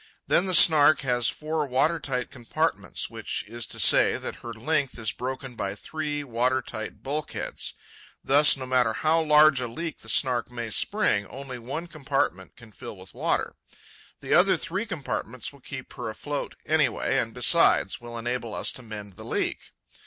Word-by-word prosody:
Then 185 - +2
the 185 - +2
Snark 155 -2 +6
has 125 -3 +1
four 155 -1 -2
water 150 +6 +2
tight 125 -2 -3
compartments, 120 -3 -2
which - - -4
is 115 +1 -5
to - - -6
say - - +6
that - - -4
her 120 - -8
length 135 +4 -1
is 110 -1 -2
broken 130 +1 -5
by 100 -2 -3
three 150 +5 -4
water 125 0 +1
tight 110 -3 -7
bulkheads. 150 +3 -3 0.5
Thus, 145 +1 +6
no 130 - -5
matter 125 -3 +2
how 160 +6 +2
large 150 -2 +6
a 125 - -2
leak 160 +7 -5
the 115 - -12
Snark 120 0 +2
may 120 -2 -5
spring, 105 - +1
Only 130 -2 -8
one 135 +8 -5
compartment 135 - -2
can 115 -4 -15
fill 105 - -9
with 95 +1 -14
water. - - -1 0.7
The - - -1
other 185 +2 +5
three 190 +5 -4
compartments 135 - -4
will 140 - -16
keep 130 0 -8
her 120 -2 -5
afloat, 145 +6 -5
anyway, 150 -5 +2
and, - - -2
besides, - - +3
will 120 0 -7
enable 120 -2 -3
us - - +2
to - - -9
mend 105 -4 -8
the - - -11
leak. - - -2
130 Hz, 175 wpm, -26 LUFS, 115-150 Hz, 0.7 s, Snark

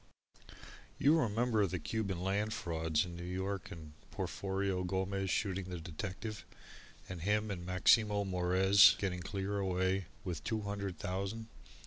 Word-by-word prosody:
You 155 +4 +5
remember 115 -3 +2
the 90 - -3
Cuban 100 +2 -2
Land 100 +3 0
frauds 80 -2 0
in 85 -1 -8
New 85 - -7
York 95 +2 -3
and 80 -3 -10 0.2
Porforio 95 -1 -2
Gomez 95 +1 -1
shooting 95 -1 0
the 90 -1 -5
detective, 95 +6 -6 0.6
and 90 -3 -6
him 105 +3 +1
and 90 -3 -4
Maximo 105 +3 +4
Morez 95 +2 +5
getting 95 -2 -2
clear 100 +3 -3
away 95 -1 0 0.2
with 90 -6 -4
two 110 -2 -1
hundred 100 -2 -4
thousand? 100 +5 -4
95 Hz, 135 wpm, -34 LUFS, 90-100 Hz, 0.6 s, You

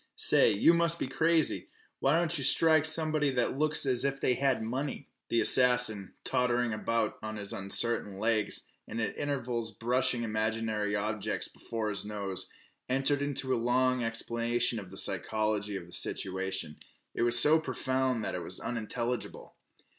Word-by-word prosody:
"Say, - - +3
you 165 +11 +4
must 170 0 +2
be - - -3
crazy! 160 +4 0 0.3
Why 140 +4 +2
don't 170 0 +1
yeh 140 - -1
strike 160 +2 +4
somebody 155 -2 +3
that 125 +2 -1
looks 155 -1 +4
as 130 -2 +3
if 135 0 -1
they 125 - +1
had 130 -3 0
money?" 135 +5 -5 0.2
The 115 - +1
assassin, 125 -6 +4
tottering 125 -2 +1
about 110 +1 -2
on 110 0 -6
his 100 -1 -3
uncertain 100 0 +1
legs, 110 0 0 0.2
and 115 - -6
at 110 - -3
intervals 125 -5 -3
brushing 120 +2 0
imaginary 110 -1 -2
obstacles 105 0 -2
from - - -21
before 110 -2 -4
his 100 - -1
nose, 100 -3 -2 0.4
entered 135 +2 +1
into 135 -2 0
a 120 - -1
long 130 +1 +1
explanation 115 0 0
of 95 -3 -11
the 95 - -11
psychology 105 +2 -2
of 90 - -6
the 90 - -17
situation. 95 -4 -2 0.4
It - - -4
was 120 0 +4
so 155 +6 +5
profound 130 -6 -2
that - - -4
it - - -4
was - - +1
unintelligible. 120 +1 -4
120 Hz, 160 wpm, -29 LUFS, 110-135 Hz, 0.4 s, so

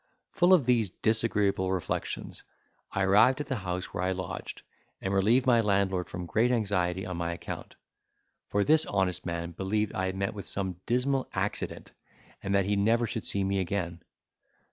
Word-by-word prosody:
Full 175 +1 +3
of 175 -8 +6
these 120 -5 +2
disagreeable 105 -3 +1
reflections, 95 -3 -3 0.5
I 100 - 0
arrived 105 +8 +5
at 150 - -2
the 135 -2 -2
house 90 -2 -4
where 90 - -2
I 95 +1 +1
lodged, 90 -2 -6 0.4
and 95 - -2
relieved 110 +7 +3
my 120 -3 +5
landlord 95 -3 +1
from 90 0 -5
great 110 +7 +2
anxiety 95 -6 0
on 90 -2 -4
my 85 0 -2
account; - - -7 0.7
for 100 - +1
this 155 +6 +4
honest 95 -2 0
man 85 0 -3
believed 100 +4 -1
I 95 0 -1
had 95 - -3
met 95 0 -1
with 100 -2 -7
some 95 -3 -3
dismal 130 +3 +1
accident, - - -3 0.5
and 100 0 -1
that 100 -1 +3
he 100 +1 +1
never 115 +4 +3
should 110 -1 -4
see 100 - 0
me 100 0 0
again. 85 -2 -2
100 Hz, 175 wpm, -29 LUFS, 95-115 Hz, 0.7 s, of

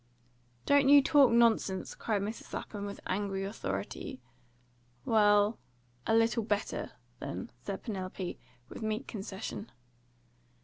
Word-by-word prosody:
"Don't 285 -1 +5
you 285 -1 +9
talk 280 -3 +6
nonsense!" 230 -5 +3
cried 210 -3 -1
Mrs. 215 +3 -6
Lapham, 205 -1 -5
with 200 - -7
angry 195 0 -1
authority. 100 - -4 0.9
"Well, 205 0 +4 0.5
a 225 - +4
little 230 +1 +3
better, 210 -1 -2 0.3
then," - - -5
said - - -5
Penelope, 185 -4 -4 0.3
with - - -9
meek 220 +4 -2
concession. 205 0 -6
210 Hz, 115 wpm, -31 LUFS, 195-230 Hz, 0.9 s, you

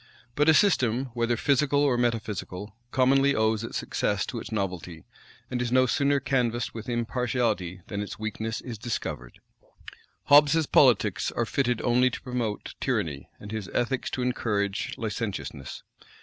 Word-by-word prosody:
But 150 +5 +3
a 160 - +7
system, 130 - +2
whether 120 0 0
physical 145 +2 +2
or 140 -4 +3
metaphysical, 110 -4 -2
commonly 135 +2 +3
owes 110 0 +1
its 115 - -4
success - - -1
to - - -5
its - - -8
novelty; 90 -5 -4 0.5
and 125 -1 -1
is 120 -1 -2
no 130 0 +5
sooner 140 +3 +2
canvassed 120 -3 0
with 110 +1 -7
impartiality 115 -6 -1
than 100 0 -4
its 105 - -6
weakness 110 +1 -4
is 120 -5 -7
discovered. 105 - -5 0.8
Hobbes's 150 +2 +6
politics 115 -9 +3
are 120 - -1
fitted 125 -1 0
only 125 +1 +4
to - - -7
promote 120 -5 -3
tyranny, 85 - -2
and 105 - -9
his 110 -3 -4
ethics 125 +2 0
to 125 - -3
encourage 105 -5 -1
licentiousness. 105 - -5
120 Hz, 150 wpm, -27 LUFS, 105-130 Hz, 0.8 s, a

